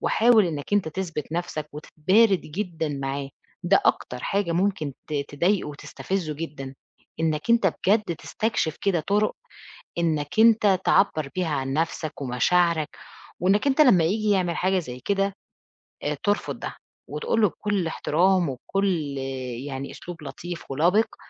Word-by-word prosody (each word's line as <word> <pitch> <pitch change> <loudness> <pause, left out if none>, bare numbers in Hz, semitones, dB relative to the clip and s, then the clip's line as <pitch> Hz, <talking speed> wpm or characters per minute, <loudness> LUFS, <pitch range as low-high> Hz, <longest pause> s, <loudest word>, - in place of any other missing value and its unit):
وحاول 225 -4 +4
إنك 150 +1 -5
أنت 205 -5 +2
تثبت 160 -3 -5
نفْسك 160 -3 -3
وتتبارد 185 +7 +2
جدًا 165 -1 -4
معاه، 140 -1 -3 0.3
ده 190 +3 +4
أكتر 125 - +1
حاجة 195 -3 0
ممكن 180 -5 0 0.2
ت 155 - -7 0.2
تضايقه 175 +3 +1
وتستفزه 155 +2 -4
جدًا، 140 -4 -6 0.5
إنك 155 +4 0
أنت 230 -4 +4 0.2
بجد 200 -4 +2
تستكشف 170 -2 -2
كده 190 -4 +2
طُرُق 205 +6 +1 0.6
إنك 155 0 -1
أنت 215 -4 +5
تعبّر 155 -7 +3
بيها 180 -3 0
عن 135 0 -2
نفْسك 155 -1 -2
ومشاعرك، 155 +5 +2 0.5
وإنك 195 - +2
أنت 280 +2 +4
لمّا 200 - +6
ييجي 210 +6 +1
يعمل 180 -4 +1
حاجة 190 +1 +2
زي 125 -7 -7
كده، 195 +6 0 0.9
ترفض 205 -1 0
ده، - - -6 0.3
وتقول 460 - -1
له 210 - +5
بكلّ 200 -2 -2
احترام 175 +2 +2
وكلّ 155 +1 -1 0.5
يعني 135 -1 -5
أسلوب 170 -2 -9
لطيف 165 +3 -7
ولبق، 175 +10 +2
175 Hz, 135 wpm, -25 LUFS, 150-200 Hz, 0.9 s, لمّا